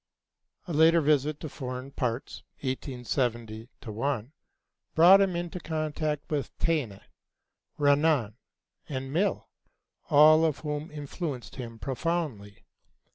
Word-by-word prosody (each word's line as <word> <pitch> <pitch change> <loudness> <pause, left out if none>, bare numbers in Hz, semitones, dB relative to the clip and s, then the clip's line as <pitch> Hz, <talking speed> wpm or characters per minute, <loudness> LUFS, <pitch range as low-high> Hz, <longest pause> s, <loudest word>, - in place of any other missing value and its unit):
A 170 - -4
later 160 +2 +6
visit 150 -1 +2
to 155 - -4
foreign 130 -1 -6
parts 125 -2 -3 0.2
(1870 125 -4 -3 0.2
1) 115 +2 -2 0.6
brought 180 +5 +8
him 190 -3 +1
into 175 +1 -4
contact 155 -2 -2
with 145 -3 -3
Taine, 140 -12 -1 0.8
Renan, 145 -6 +3 0.5
and 135 -1 -4
Mill, 195 +5 0 0.6
all 155 +1 +7
of 155 -3 +1
whom 150 +1 -4
influenced 145 - -6
him 115 -3 -7
profoundly. 135 - -3
145 Hz, 105 wpm, -28 LUFS, 125-160 Hz, 0.8 s, brought